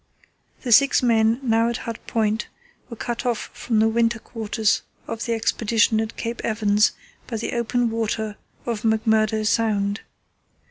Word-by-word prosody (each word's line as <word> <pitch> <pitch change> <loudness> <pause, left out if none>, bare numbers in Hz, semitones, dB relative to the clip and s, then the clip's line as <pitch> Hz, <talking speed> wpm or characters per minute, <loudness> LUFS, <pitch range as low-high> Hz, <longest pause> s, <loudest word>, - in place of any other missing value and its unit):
The 245 - -2
six 275 +3 +5
men 225 0 +3
now 230 -1 +2
at 235 - -2
Hut 230 -1 -5
Point 220 0 0 0.4
were 235 - -7
cut 235 +1 -4
off 240 -3 -2
from 230 -3 -2
the 220 +1 +4
winter 230 +1 +2
quarters 220 -1 -1 0.3
of 225 - -4
the 230 - +1
Expedition 225 0 +2
at 220 0 -5
Cape 230 0 -4
Evans 215 -1 +2 0.3
by 230 - -3
the 220 - -4
open 240 0 0
water 220 -1 -2 0.3
of 230 -3 -2
McMurdo 220 -1 +2
Sound. 210 -2 +1
225 Hz, 150 wpm, -23 LUFS, 220-235 Hz, 0.4 s, six